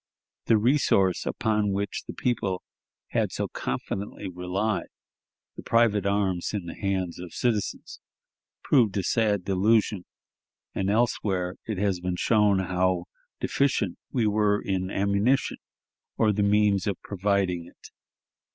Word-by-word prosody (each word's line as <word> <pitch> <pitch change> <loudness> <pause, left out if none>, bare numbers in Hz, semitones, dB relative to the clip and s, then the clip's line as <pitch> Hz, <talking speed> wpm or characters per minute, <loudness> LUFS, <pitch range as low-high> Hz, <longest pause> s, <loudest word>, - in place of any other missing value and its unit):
The 115 - +4
resource 105 -6 +2
upon 105 -2 0
which 100 +1 -3
the - - -6
people 100 -7 -1 0.5
had - - 0
so - - -2
confidently 100 0 -4
relied, 95 +4 -2 0.7
the - - -7
private 110 -4 +2
arms 100 -1 0
in 100 -4 -3
the 85 - -6
hands 95 -4 -2
of 90 -1 -9
citizens, 110 -5 -2 0.6
proved 115 -9 +3
a 95 - 0
sad 105 -2 +1
delusion, 100 0 +2 0.7
and 95 - -1
elsewhere 100 -5 0
it 110 -3 -2
has 95 -2 0
been 90 0 -2
shown 105 +1 +3
how 95 -1 +1 0.4
deficient 125 -10 0
we 120 -4 +1
were 105 -1 +2
in 95 -1 -2
ammunition, 100 +7 +1 0.6
or 110 -2 +3
the 105 - 0
means 100 -2 +3
of 100 -3 -1
providing 95 -3 0
it. - - -16
100 Hz, 130 wpm, -26 LUFS, 95-105 Hz, 0.7 s, The